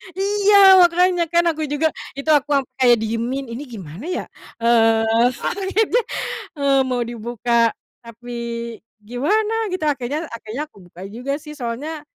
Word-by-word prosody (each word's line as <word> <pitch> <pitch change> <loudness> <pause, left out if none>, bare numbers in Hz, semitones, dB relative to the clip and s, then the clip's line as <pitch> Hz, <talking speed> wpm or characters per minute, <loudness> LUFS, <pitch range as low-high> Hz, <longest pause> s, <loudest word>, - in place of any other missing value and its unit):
Iya! 400 -1 +6
Makanya 350 0 +3
kan 340 +1 +2
aku 310 -1 -4
juga, 295 +2 0 0.2
itu 280 +3 -5
aku 295 0 +3
ampe 260 0 -3 0.2
diemin, 235 +5 -2
ini 255 +5 -6
gimana 195 - -9
ya? 365 - -2 0.4
Eee, 225 0 +3
paketnya, 410 +4 0 0.6
eee, 275 -1 +2
mau 250 -1 -1
dibuka 235 0 0 0.3
tapi 235 +1 -12 0.7
gimana 425 - 0
gitu 370 -4 -4
akhirnya 290 +2 -1
akhirnya 230 +4 -6
aku 305 -9 -14
buka 175 +2 -12
juga 255 +5 -3
sih 300 - -9
soalnya, 290 +6 -5
275 Hz, 135 wpm, -20 LUFS, 235-340 Hz, 0.7 s, Iya